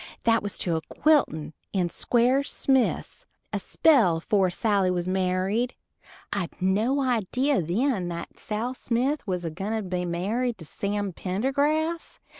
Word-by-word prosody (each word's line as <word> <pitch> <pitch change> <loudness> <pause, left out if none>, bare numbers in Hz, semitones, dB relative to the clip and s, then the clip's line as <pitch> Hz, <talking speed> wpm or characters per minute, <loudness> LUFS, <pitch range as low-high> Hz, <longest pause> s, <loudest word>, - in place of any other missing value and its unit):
That 230 0 +3
was 205 -1 -3
to 170 -2 0
a 160 - -1
quiltin' 160 - +1 0.2
to 180 -3 +1
Squire 245 +8 +2
Smith's 270 - 0 0.3
a - - 0
spell 230 - +4
afore 190 +3 +2
Sally 200 0 +1
was 180 -1 -1
married. 190 +6 0 0.6
I'd 190 -5 -3
no 215 +9 +1
idee 255 +3 +1
then 190 - 0
that 170 -1 -6
Sal 225 +4 -3
Smith 255 +2 -1
was 180 -2 -2
a 165 - -2
gwine 195 +7 -4
to 220 -1 -1
be 180 -1 -2
married 215 +8 -1
to 165 - -10
Sam 200 +3 -3
Pendergrass. 285 - -1
205 Hz, 145 wpm, -26 LUFS, 180-255 Hz, 0.6 s, spell